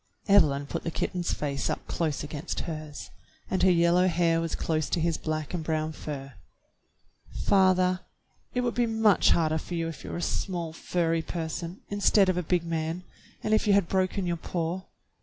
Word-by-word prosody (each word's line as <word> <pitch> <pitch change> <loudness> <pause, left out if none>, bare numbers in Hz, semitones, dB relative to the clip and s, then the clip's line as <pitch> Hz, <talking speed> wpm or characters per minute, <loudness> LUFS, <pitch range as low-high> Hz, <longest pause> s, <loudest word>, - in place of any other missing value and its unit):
Evelyn 150 -9 +5
put - - -4
the - - -2
kitten's 175 +1 -2
face 140 -2 -2
up - - -3
close 155 -4 -1
against 150 +3 -4
hers, 155 -3 -6 0.4
and 185 - +1
her 185 - +6
yellow 175 +1 +4
hair 165 -1 +2
was 165 -1 -2
close 155 -2 -1
to - - 0
his 165 0 +1
black 155 0 -3
and 170 -3 -2
brown 155 0 -1
fur. 135 -3 -7 0.6
*' - - -12
Father, 185 -1 +4 0.6
it 250 - +2
would 240 -1 0
be 240 0 +1
much 220 -3 +4
harder 160 -1 +2
for 175 - -6
you 165 -1 -1
if 165 - -7
you - - -7
were - - -4
a 175 - -3
small 170 -4 -2
furry 165 0 0
person, 165 +2 -5
instead 205 -1 +4
of 185 - +2
a - - +2
big 175 0 +1
man, 165 +1 -2 0.4
and 215 - +1
if 215 - +3
you 205 - +5
had 200 -3 +4
broken 190 +1 0
your 175 -1 -1
paw. 170 +2 -3
170 Hz, 195 wpm, -28 LUFS, 160-185 Hz, 0.6 s, her